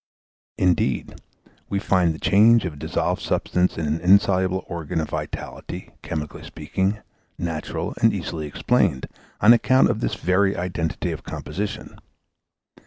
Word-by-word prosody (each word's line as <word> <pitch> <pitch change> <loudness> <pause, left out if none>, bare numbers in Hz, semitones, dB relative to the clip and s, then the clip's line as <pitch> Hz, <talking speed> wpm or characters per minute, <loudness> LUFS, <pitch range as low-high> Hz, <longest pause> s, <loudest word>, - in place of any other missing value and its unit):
Indeed 90 -9 0 0.5
we 100 - -1
find 95 -3 +2
the 80 - -6
change 110 +2 +5
of 85 - -3
a - - -12
dissolved 70 - -2
substance 90 +1 0
into 80 -2 -2
an - - -11
insoluble 95 0 +3
organ 80 -2 -3
of 80 - -3
vitality, - - -6
chemically 75 -2 -5
speaking, 95 +3 -2 0.4
natural 80 -3 -3
and - - +5
easily 80 -2 -4
explained, 85 - +1 0.4
on 110 +4 +8
account 130 +3 +4
of - - -3
this - - -1
very 95 +3 +1
identity 85 -2 -2
of - - -5
composition. 95 +8 -6
90 Hz, 135 wpm, -23 LUFS, 80-100 Hz, 0.5 s, on